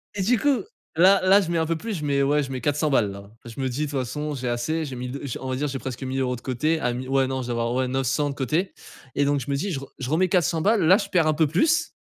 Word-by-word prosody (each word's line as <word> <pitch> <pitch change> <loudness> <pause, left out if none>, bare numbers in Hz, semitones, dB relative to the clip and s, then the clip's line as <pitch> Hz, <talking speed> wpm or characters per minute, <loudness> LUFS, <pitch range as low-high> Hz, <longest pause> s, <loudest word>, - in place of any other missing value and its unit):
Et 195 - -1
du 235 +3 +2
coup, 275 -8 +2 0.3
là 190 +3 +6
là, 195 +2 +6
je 170 -3 -3
mets 170 - +1
un 160 - +1
peu 165 - 0
plus, 220 +6 -5
je - - -6
mets 140 -1 +2
ouais 145 +2 +2
je 135 - -6
mets 130 - -4
400 150 +3 +1
balles 110 -7 +2
là. 100 0 -10 0.2
Je 120 +3 -9
me 130 - 0
dis, 145 +5 -2
de 145 - -6
toute 140 - -1
façon 150 +5 -3
j'ai 125 -1 -3
assez, 120 +7 -1
j'ai 135 -3 -6
1000 125 0 -5
d 140 - -5 0.2
on 130 - -5
va 130 - -1
dire, 145 +3 -1
j'ai 135 - -3
presque 130 0 -6
1000€ 130 -1 -1
de 120 - -11
côté. 155 +6 0
Ah 120 -1 0
mi 130 +1 -5
ouais 135 0 +2
non, 130 0 -2
je - - -7
dois 120 - -1
avoir 120 +1 -1
ouais 130 0 +1
900 135 +3 0
de - - -8
côté. 155 - -1 0.4
Et 145 - +2
donc 145 0 +1
je 135 +2 -5
me - - +1
dis 175 +9 -2
je 135 - -2
re 140 - -9
je 130 0 -4
remets 175 +5 +2
400 170 -3 +2
balles, 215 +4 +3
là 185 +4 +7
je 200 -2 -4
perds 175 -5 +3
un 155 - +3
peu 160 0 +3
plus. 320 - +2
140 Hz, 325 wpm, -24 LUFS, 130-165 Hz, 0.4 s, là